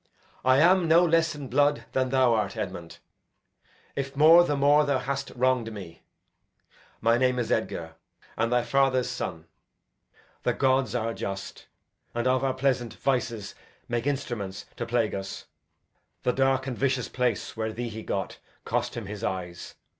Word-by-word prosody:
I 130 0 +5
am 175 +2 +5
no 170 +2 +6
less 165 -1 +2
in 145 -2 -7
blood 145 -2 +2
than 130 -1 0
thou 130 -2 +4
art, 105 -2 -1
Edmund; 90 -5 -5 1.0
If 135 0 -4
more, 160 +4 +8
the 150 -4 0
more 145 +2 +5
th' 140 -3 0
hast 140 +1 -3
wrong'd 125 -2 +1
me. 95 -6 -9 1.0
My 115 +1 +3
name 125 0 +2
is 120 - -2
Edgar 80 -1 -2 0.4
and 115 +1 0
thy 125 -1 +3
father's 130 0 +2
son. 85 -9 -5 1.0
The - - +1
gods 130 -1 +1
are 115 -1 -1
just, 100 -2 -6 0.5
and 120 - -1
of 130 +1 +2
our 135 -1 0
pleasant 130 -3 0
vices 120 -6 -1 0.3
Make 120 +2 -2
instruments 120 -9 -3
to 120 - -4
scourge 115 -2 +1
us. 95 0 -6 0.8
The 125 - +2
dark 135 0 +2
and 130 -2 -3
vicious 130 0 0
place 125 -6 -1
where 110 -1 -2
thee 120 +1 -4
he 110 0 -7
got 100 -2 -4 0.3
Cost - - -1
him 115 - -5
his 105 +2 -7
eyes. 90 -4 -4
125 Hz, 160 wpm, -27 LUFS, 110-135 Hz, 1.0 s, more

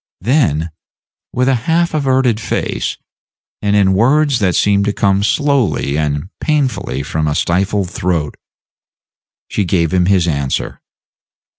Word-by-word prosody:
Then, 85 - +1 0.6
with 125 +1 0
a 135 - +3 0.2
half 170 +1 +2
averted 130 -6 +1
face, - - -3 0.6
and 105 0 +1
in 95 -2 +3
words 135 +6 +3
that 95 -4 +1
seemed 100 -1 +2
to 105 - 0
come 100 -1 +1
slowly 130 - +1
and 75 +2 -2
painfully 135 - -1
from 75 +2 -2
a 75 - -1
stifled 95 +2 0
throat, 90 -9 -2 1.1
she 105 - -1
gave 85 -3 0
him 90 -1 +2
his 95 -3 +2
answer. 70 -4 -2
100 Hz, 130 wpm, -16 LUFS, 85-130 Hz, 1.1 s, a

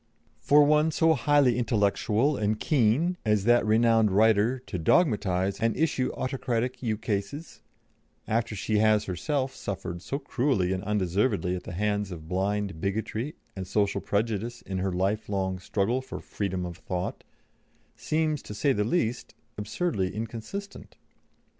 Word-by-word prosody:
For 145 +1 +5
one 150 +2 +4
so 160 +1 +3
highly 140 -2 +3
intellectual 115 +3 +1
and 105 -2 0
keen 150 +5 +2
as 105 -3 +2
that 120 +2 +4
renowned 115 0 +4
writer 110 +4 +3
to 90 - -4
dogmatise 100 - +2
and 115 0 +1
issue 140 -4 +1
autocratic 130 -1 -2
ukases, 110 +5 -3 0.7
after 115 0 0
she 105 +2 0
has 110 -1 +4
herself 130 - -2
suffered 90 -3 -5
so 135 - -3
cruelly 125 -9 0
and 95 0 -3
undeservedly 100 -1 0
at 90 - -7
the - - -6
hands 105 +1 -1
of 80 -4 -8
blind 95 -1 -1
bigotry 110 +7 -2 0.2
and 95 -1 -5
social 100 +1 0
prejudice 110 +2 -2
in 95 -1 -4
her 95 +1 -1
lifelong 95 0 -1
struggle 105 +7 0
for 130 - -7
freedom 95 -3 -3
of 85 -1 -7
thought 90 -1 -4 0.7
seems, 155 -2 -1
to 105 - -9
say 140 +6 +2
the 105 - 0
least, 115 -1 -1 0.2
absurdly 105 - -2
inconsistent." 115 - -6
110 Hz, 140 wpm, -27 LUFS, 100-130 Hz, 0.7 s, For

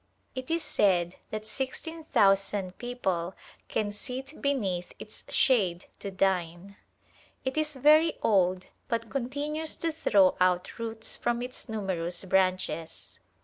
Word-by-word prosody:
It 260 0 -6
is 330 0 +1
said 180 - +2
that 215 0 -4
sixteen 305 +7 -4
thousand 195 -4 +2
people 190 -8 -2 0.3
can 205 -1 -1
sit 255 +7 -7
beneath 195 -11 -1
its 215 - -10
shade 190 -10 +2
to 200 - -4
dine. 190 -1 -1 0.7
It 260 - -1
is 305 -1 0
very 305 +4 +5
old 185 -3 +3 0.2
but 230 -2 -2
continues 290 +4 -1
to 330 - -1
throw 200 -11 +4
out 180 +3 +2
roots 225 -1 -3
from 240 0 -1
its 250 -1 -8
numerous 185 -4 -2
branches. 185 -3 0
210 Hz, 125 wpm, -29 LUFS, 185-265 Hz, 0.7 s, very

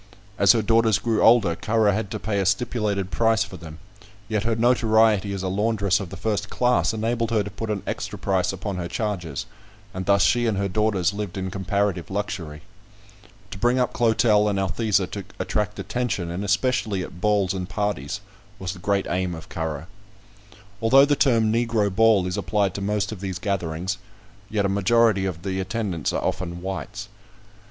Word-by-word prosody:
As 100 -2 +7
her 115 - +1
daughters 115 -1 +3
grew 110 +1 0
older, 110 -8 +5
Currer 110 +1 +2
had 100 0 -2
to 110 - -4
pay 105 -1 -1
a 95 - 0
stipulated 100 -2 0
price 115 +3 +2
for 95 - -9
them; 80 -2 -10 0.5
yet 110 -1 -1
her 115 -1 +1
notoriety 110 -3 +3
as 95 -1 -4
a - - -1
laundress 100 0 +1
of 100 -4 -6
the 95 - -8
first 105 -2 -2
class 125 0 +2
enabled 115 +1 -1
her 110 -3 +1
to 100 - -7
put 110 +3 -5
an 105 -2 -2
extra - - -4
price 95 -2 0
upon 95 0 -5
her 85 -1 -3
charges, 90 - -3 0.5
and 95 0 -5
thus 100 0 +4
she 120 0 +3
and 110 -3 0
her 100 0 0
daughters 100 -2 +1
lived 100 -2 -5
in 95 -1 -3
comparative 100 -1 -1
luxury. 95 -7 -4 0.9
To 95 - -7
bring 120 +3 +2
up 125 -1 +1
Clotel 110 -2 +3
and 100 - -1
Althesa 95 +1 +1
to 100 - -5
attract 105 0 -2
attention, 115 -9 -2
and 90 +4 -4
especially 105 -2 0
at 90 - -10
balls 100 -3 +2
and 90 -1 -4
parties, 105 -9 -2 0.4
was 95 -2 -4
the 90 - -12
great 100 +2 0
aim 90 0 -1
of 80 - -11
Currer. 80 -1 -4 1.0
Although 135 +5 +6
the 145 0 +2
term 115 -6 +3
"Negro 115 -4 +1
ball" 110 -3 +4
is 90 0 -3
applied 100 -3 0
to 100 - -5
most 105 +1 -1
of 105 -4 -7
these 95 -3 -3
gatherings, 95 -1 -2 0.5
yet 105 -2 0
a - - +3
majority 100 0 +3
of 85 -2 -6
the 95 -1 -2
attendants 95 -4 -2
are - - -2
often 90 -1 -3
whites. 105 +2 -5
100 Hz, 185 wpm, -24 LUFS, 95-110 Hz, 1.0 s, As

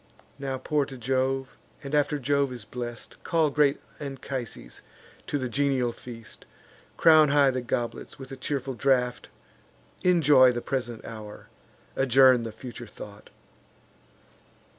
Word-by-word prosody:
Now 135 -1 -3
pour 145 +1 0
to 135 - -9
Jove; 130 +1 -1 0.3
and, 140 +1 -7
after 150 0 +2
Jove 140 0 +1
is 120 -4 -8
blest, 120 +1 -7
Call 160 -3 +2
great 145 -1 +3 0.2
Anchises 135 - -6 0.5
to 145 - -1
the 130 -2 -2
genial 130 -1 +1
feast: 115 -2 -10 0.5
Crown 155 -2 +6
high 140 -1 +4
the 130 0 -2
goblets 120 -1 -4
with 135 0 -10
a - - -5
cheerful 135 0 -3
draught; 125 0 0 0.7
Enjoy 150 -8 +6
the 120 - -3
present 120 -3 -4
hour; 110 -2 -9 0.5
adjourn 130 -1 +5
the 115 -1 -5
future 120 +1 -9
thought." 105 0 -12
130 Hz, 130 wpm, -27 LUFS, 120-140 Hz, 0.7 s, Crown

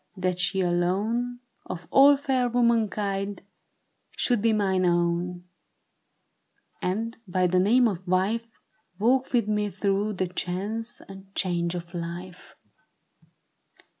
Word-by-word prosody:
That 185 -1 -1
she 190 +1 +1
alone, 205 +8 0 0.3
of 180 -2 -6
all 280 +1 +7
fair 260 -3 0
womankind. 210 -5 0 0.7
Should 240 -4 +1
be 225 +1 +3
mine 195 -3 +1
own, 175 0 0 1.4
and, 220 +5 -2
by 185 0 +1
the 180 +1 +3
name 235 +6 +4
of 190 -3 -4
wife. 205 +6 +1 0.5
Walk 255 +6 +2
with 235 -4 +2
me 210 -1 0
through 200 +2 0
the 185 -1 -1
chance 200 +6 -4
and 195 0 -12
change 170 -1 0
of 170 0 -7
life. 175 +1 -7
195 Hz, 115 wpm, -26 LUFS, 180-230 Hz, 1.4 s, all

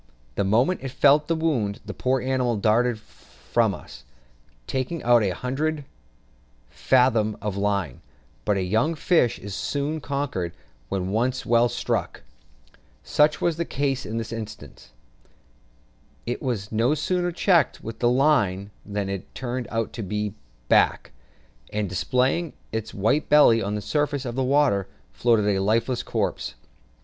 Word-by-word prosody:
The - - 0
moment 120 - +2
it 135 - -4
felt 145 +3 +4
the 165 - +1
wound, 130 -11 0
the - - -6
poor 130 0 0
animal 125 -3 0
darted 115 +3 +2
from 105 - -2
us, 65 -1 -12 0.6
taking 135 - -3
out 120 -1 +5
a 100 - +1
hundred 140 - -2 0.9
fathom 120 -5 +2
of 105 -2 -3
line; 100 -8 -1 0.4
but 105 -2 +1
a 95 - 0
young 110 - +1
fish 155 -6 +2
is 100 -1 -8
soon 145 +9 -2
conquered 140 -13 -3 0.4
when 95 -1 -2
once 125 +4 0
well 120 +1 +4
struck: - - -2 0.8
such 150 +1 +2
was 170 -2 +1
the 170 - 0
case 135 -3 -1
in 110 +2 -4
this 115 0 -4
instance; 110 - -8 1.4
it 120 - -3
was 115 -7 -3
no 115 +7 +2
sooner 175 +2 0
checked 170 -4 +2
with 115 0 -7
the 120 - +3
line 110 -8 +2
than 100 -1 -3
it 100 -1 -6
turned 125 -1 -4
on 115 -1 -1
its 105 -1 -3 0.3
back, - - +3 0.6
and, 105 -1 -1
displaying 130 - 0 0.2
its 110 0 -3
white 110 +10 0
belly 130 -6 +6
on 105 +1 -2
the 105 - -3
surface 145 +2 -1
of 120 - -3
the 130 +2 -1
water, 130 -7 +2 0.3
floated 115 -3 +2
a 95 - 0
lifeless 115 +4 +1
corpse. - - -2
120 Hz, 145 wpm, -24 LUFS, 105-140 Hz, 1.4 s, belly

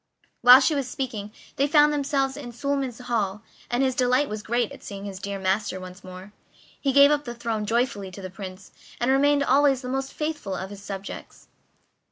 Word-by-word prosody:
While 250 +2 +9
she 305 - +3
was 275 -3 -2
speaking, 225 -6 -4 0.3
they 280 - +3
found 295 0 +5
themselves 275 -2 0
in 245 -5 -8
Suliman's 270 -1 -2
hall, 215 -4 -2 0.3
and 245 +2 +1
his 260 -1 +2
delight 255 +3 +2
was 215 0 -4
great 235 +2 -1
at - - -11
seeing 200 0 -8
his 195 -2 -6
dear 200 0 -4
master 190 0 -1
once 185 +1 -10
more. 185 +2 -11 0.5
He 275 - +1
gave 280 +2 +7
up 295 -1 +1
the 240 -1 -6
throne 225 -3 -3
joyfully 225 -4 0
to 190 +1 -10
the 185 - -6
Prince, 190 0 -9 0.3
and 245 +2 +2
remained 285 +1 +3
always 275 -1 +3
the 250 - -5
most 270 +1 -2
faithful 300 -11 -3
of 190 +1 -6
his 200 -1 -9
subjects. 195 -1 -8
240 Hz, 200 wpm, -25 LUFS, 200-275 Hz, 0.5 s, While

